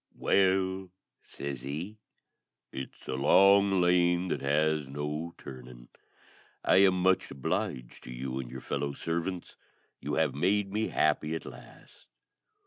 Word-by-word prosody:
"Well," 95 -1 +1 0.3
says 70 -3 -7
he, 80 - -6 0.7
"it's 65 - -8
a - - -3
long 100 +7 +5
lane 90 0 +3
that - - -2
has 75 +1 +1
no 75 +4 -4
turning. 65 -2 -11 0.8
I - - +5
am 95 -1 +5
much 95 0 +2
obliged 65 -2 -3
to - - -8
you 65 +1 -4
and 65 -2 -6
your 65 +1 -8
fellow 70 0 -3
servants. 85 +4 -4 0.4
You - - -3
have - - +1
made 95 +5 0
me 110 +1 0
happy 75 +1 +1
at 80 - -6
last. - - -14
80 Hz, 135 wpm, -29 LUFS, 70-95 Hz, 0.8 s, long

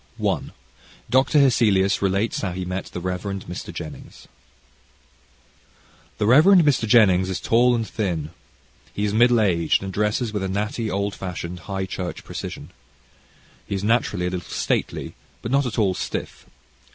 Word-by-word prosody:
CHAPTER - - 0
I - - -18 0.6
Dr. 130 +4 +3
Hesselius 105 -8 +3
Relates 100 +3 0
How 95 -4 -2
He 90 0 -4
Met 90 +1 -4
the - - -7
Rev. 90 0 -3
Mr. 95 -3 -6
Jennings - - -9 1.9
The - - 0
Rev. 135 +9 +6
Mr. 160 - +5
Jennings 95 -5 +5
is 95 - -2
tall 120 +2 +3
and 115 -2 -2
thin. 85 -8 -3 0.6
He 105 - -1
is 105 - -1
middle 120 +1 +5
aged, 90 -4 +2
and 95 -1 -5
dresses 105 +3 0
with 105 - -2
a 95 - -1
natty, 105 +3 -2
old 100 +1 -1
fashioned, 90 -1 -6
high 95 -1 -2
church 90 -1 -5
precision. - - -7 1.0
He - - -2
is 100 - -3
naturally 105 -5 +1
a 90 - -1
little 90 -2 -5
stately, - - -2 0.3
but 115 - -4
not 140 -1 +2
at 115 - -5
all 100 -4 +2
stiff. - - -5
100 Hz, 160 wpm, -23 LUFS, 95-115 Hz, 1.9 s, Rev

